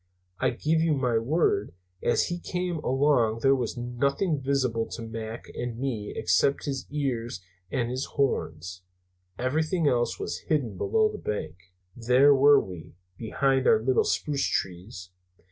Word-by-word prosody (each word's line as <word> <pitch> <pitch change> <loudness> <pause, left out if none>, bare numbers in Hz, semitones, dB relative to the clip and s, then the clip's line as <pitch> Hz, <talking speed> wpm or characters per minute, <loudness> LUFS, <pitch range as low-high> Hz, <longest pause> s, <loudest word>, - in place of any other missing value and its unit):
I 130 - +2
give 155 +6 0
you 160 -2 +2
my 125 -4 +1
word, 115 - 0 0.3
as 120 - +1
he 175 0 -3
came 180 -1 -3
along 130 -5 +2
there 135 - +5
was 125 -2 -2
nothing 140 +6 -1
visible 130 -4 0
to 115 - -7
Mac 110 0 -6
and 120 -1 -4
me 115 -5 -3
except 90 +10 +1
his 135 -2 -4
ears 125 - -2 0.3
and 120 -2 -1
his 130 +2 -2
horns. 90 - -1 0.6
Everything 155 +6 0
else 120 -3 +1
was - - -4
hidden 135 - 0
below 440 - +2
the - - -7
bank. 90 -6 -4 0.4
"There 125 +4 +5
were 140 +1 +6
we 90 -6 -8 0.2
behind 130 +5 0
our - - +6
little 125 +3 +2
spruce 145 -2 0
trees. 90 0 -4
125 Hz, 145 wpm, -27 LUFS, 115-140 Hz, 0.6 s, were